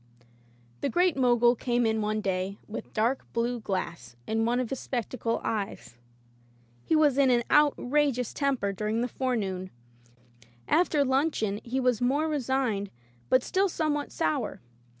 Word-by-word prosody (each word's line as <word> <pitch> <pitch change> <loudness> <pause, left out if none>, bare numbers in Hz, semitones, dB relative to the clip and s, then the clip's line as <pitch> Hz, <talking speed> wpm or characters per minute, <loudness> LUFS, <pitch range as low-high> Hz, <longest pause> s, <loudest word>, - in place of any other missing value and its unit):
The - - -1
Great 355 -1 +2
Mogul 240 -2 +4
came 240 0 0
in 220 0 +1
one 215 0 -1
day 190 0 -2
with 215 - -7
dark 235 +5 +1
blue 235 +1 0
glass 170 - -4
in 225 0 0
one 240 +2 +1
of 250 -3 -3
his 270 - -2
spectacle 240 -1 -2
eyes. 200 - -4 0.9
He - - +1
was 295 -3 +4
in 275 -2 +5
an 240 -1 +3
outrageous 285 -3 +2
temper 265 -9 0
during 215 +3 -1
the 245 - 0
forenoon. 200 -8 -2 1.0
After 310 -3 +3
luncheon 260 -7 0
he 250 +3 -2
was 250 -3 +1
more 280 +6 +2
re 305 -2 0
signed 245 -6 -1 0.4
but 255 - +4
still 390 +1 +1
somewhat 300 -3 -1
sour. 155 - -1
245 Hz, 150 wpm, -28 LUFS, 215-275 Hz, 1.0 s, in